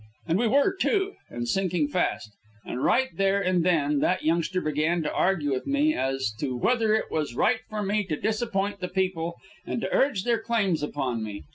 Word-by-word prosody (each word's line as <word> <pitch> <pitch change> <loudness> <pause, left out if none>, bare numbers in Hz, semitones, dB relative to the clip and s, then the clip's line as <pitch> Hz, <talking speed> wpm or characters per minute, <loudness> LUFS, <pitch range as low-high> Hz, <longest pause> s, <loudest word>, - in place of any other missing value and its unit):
And 165 +4 +1
we 235 - +2
were, 285 - +3
too, 395 0 +1 0.2
and 120 0 -4
sinking 180 0 +1
fast. 145 - -1 0.3
And 125 - -4
right 260 +1 +3
there 195 0 +2
and 185 -3 +1
then 150 -5 +2
that 180 - +1
youngster 170 +3 +1
began 155 +2 0
to 150 - -2
argue 170 -7 +1
with 130 - -3
me 285 +2 +2
as 135 - -1
to 130 -2 -2
whether 220 - +2
it 220 - -2
was 150 -6 -2
right 235 - +2
for 215 -1 -3
me 205 +1 +1
to 155 -5 -3
disappoint 210 -2 -1
the 180 - -3
people, 180 -2 -1 0.3
and - - -3
to - - -3
urge 270 -9 +2
their 235 -1 +1
claims 215 -8 0
upon 130 -6 -2
me. 100 -5 -6
185 Hz, 200 wpm, -26 LUFS, 150-220 Hz, 0.3 s, were